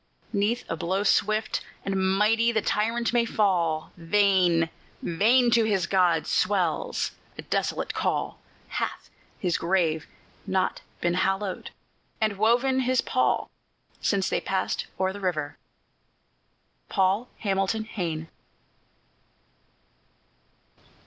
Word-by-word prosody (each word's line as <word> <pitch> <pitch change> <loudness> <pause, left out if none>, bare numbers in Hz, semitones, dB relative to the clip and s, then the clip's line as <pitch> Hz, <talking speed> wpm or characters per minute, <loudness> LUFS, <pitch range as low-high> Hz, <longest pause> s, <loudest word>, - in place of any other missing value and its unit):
'Neath 210 +4 +1
a - - -2
blow 185 +4 -1
swift 215 +2 +1 0.2
and 195 0 -1 0.2
mighty 225 +3 +3
the 220 - +1
tyrant 230 +3 0
may 240 -1 +4
fall; 175 -8 +1
Vain! 175 -2 +3 0.3
vain! 235 +8 +3
to 230 -1 +5
his 200 -5 +1
gods 175 -4 +2
swells 185 -5 0 0.3
a - - -7
desolate - - -1
call; - - -1 0.3
Hath - - -4 0.3
his 180 -3 0
grave 165 -3 +1 0.4
not 190 0 0 0.2
been 175 0 +1
hollowed, 195 +1 -1 0.5
and 215 -3 0
woven 245 +4 +3
his 255 0 +1
pall, - - 0 0.5
Since 195 -2 +1
they - - 0
passed 190 -1 -1
o'er 190 0 +1
the 205 - -7
river? 155 -6 -2 1.3
PAUL 195 +5 +1
HAMILTON 195 +1 0
HAYNE. 165 -7 -4
195 Hz, 110 wpm, -26 LUFS, 175-220 Hz, 1.3 s, to